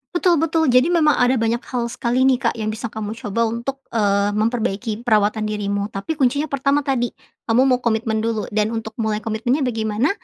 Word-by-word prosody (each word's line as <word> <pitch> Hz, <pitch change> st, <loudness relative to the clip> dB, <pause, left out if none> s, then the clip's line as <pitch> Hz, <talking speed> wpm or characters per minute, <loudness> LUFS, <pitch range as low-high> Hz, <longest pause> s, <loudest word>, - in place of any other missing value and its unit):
Betul 345 Hz, 0 st, +3 dB
betul. 325 Hz, +1 st, +1 dB
Jadi, 255 Hz, +5 st, +5 dB
memang 320 Hz, -4 st, +3 dB
ada 250 Hz, +1 st, +4 dB
banyak 230 Hz, 0 st, 0 dB
hal 245 Hz, -2 st, -2 dB
sekali 245 Hz, +2 st, 0 dB
nih 265 Hz, -1 st, +4 dB
Kak, -, -, 0 dB
yang 215 Hz, -2 st, -3 dB
bisa 220 Hz, +2 st, -5 dB
kamu 215 Hz, -1 st, -5 dB
coba 210 Hz, +1 st, -3 dB
untuk, 250 Hz, +4 st, -4 dB
eee, 200 Hz, -2 st, +2 dB
memperbaiki 225 Hz, 0 st, -1 dB
perawatan 215 Hz, -2 st, +2 dB
dirimu. 200 Hz, 0 st, -2 dB
Tapi, 195 Hz, +12 st, -4 dB
kuncinya 285 Hz, +2 st, +1 dB
pertama 275 Hz, +1 st, +1 dB
tadi, 250 Hz, -3 st, 0 dB, 0.4 s
kamu 230 Hz, +3 st, +4 dB
mau 250 Hz, -1 st, +3 dB
komitmen 220 Hz, -1 st, 0 dB
dulu, 225 Hz, -2 st, -1 dB
dan 215 Hz, +1 st, 0 dB
untuk 225 Hz, -1 st, -5 dB
mulai 220 Hz, -2 st, -1 dB
komitmennya 225 Hz, +6 st, -1 dB
bagaimana? 220 Hz, +2 st, 0 dB
230 Hz, 190 wpm, -21 LUFS, 215-260 Hz, 0.4 s, Jadi